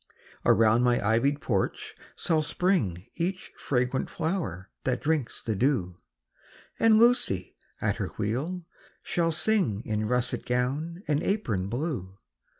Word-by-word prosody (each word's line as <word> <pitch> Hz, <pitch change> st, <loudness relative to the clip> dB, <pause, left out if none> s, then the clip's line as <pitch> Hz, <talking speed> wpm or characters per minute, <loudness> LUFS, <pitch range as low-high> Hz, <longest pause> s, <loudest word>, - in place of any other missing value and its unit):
Around 115 Hz, +1 st, +5 dB
my 120 Hz, -1 st, +3 dB
ivy'd 140 Hz, +7 st, +2 dB
porch 100 Hz, -6 st, -1 dB, 0.2 s
shall 160 Hz, -2 st, +1 dB
spring 150 Hz, -, 0 dB
Each 180 Hz, +3 st, -2 dB
fragrant 125 Hz, 0 st, -1 dB
flower 130 Hz, -, -3 dB
that 125 Hz, -1 st, 0 dB
drinks 150 Hz, -5 st, -1 dB
the 110 Hz, -, -1 dB
dew; 100 Hz, -7 st, +1 dB, 0.8 s
And 225 Hz, -1 st, +6 dB
Lucy, 230 Hz, -, +3 dB, 0.2 s
at -, -, 0 dB
her -, -, -2 dB
wheel, 155 Hz, -, -2 dB, 0.4 s
shall 165 Hz, -1 st, +1 dB
sing 160 Hz, -, +1 dB
In 110 Hz, -1 st, -1 dB
russet 125 Hz, 0 st, 0 dB
gown 145 Hz, +9 st, -1 dB
and 150 Hz, 0 st, +1 dB
apron 110 Hz, -, -1 dB
blue. 120 Hz, -, -3 dB
130 Hz, 125 wpm, -28 LUFS, 110-165 Hz, 0.8 s, And